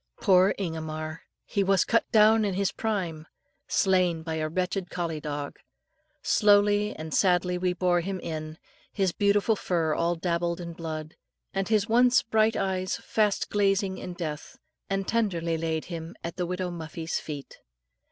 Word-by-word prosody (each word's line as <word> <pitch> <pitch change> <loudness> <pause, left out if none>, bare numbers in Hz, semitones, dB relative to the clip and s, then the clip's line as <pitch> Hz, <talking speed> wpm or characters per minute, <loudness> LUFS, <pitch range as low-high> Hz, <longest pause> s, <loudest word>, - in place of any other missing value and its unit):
Poor 185 +1 +4
Ingomar! 160 -3 -4 0.2
He 200 -3 0
was 195 -2 +3
cut 230 - +1
down 220 0 +6
in 200 -3 -1
his 195 0 +1
prime 175 -8 -3 0.4
slain 180 -4 +2
by 160 0 -4
a 155 0 -1
wretched 180 +2 -2
collie 170 -3 -3
dog. 145 -1 -5 0.6
Slowly 205 0 +4
and 155 0 -6
sadly 180 -1 +2
we 180 0 +1
bore 180 -1 +2
him 190 +2 -4
in, 155 -2 -5 0.3
his 195 -3 +1
beautiful 205 +3 +2
fur 165 -5 0
all 170 +2 +1
dabbled 170 0 -1
in 170 -1 -6
blood, 155 -1 -6 0.4
and 195 0 -1
his 215 -1 +2
once 245 +2 +4
bright 220 -1 +2
eyes 185 -1 -1
fast 210 -2 0
glazing 195 -2 +1
in 180 -1 -7
death, 155 -4 -6 0.3
and 195 -1 -1
tenderly 175 -8 0
laid 160 -1 -2
him 165 -1 -7
at 170 - -5
the 180 -1 -2
widowed 180 0 -3
Muffie's 165 0 -4
feet. 145 -3 -8
180 Hz, 155 wpm, -27 LUFS, 165-200 Hz, 0.6 s, down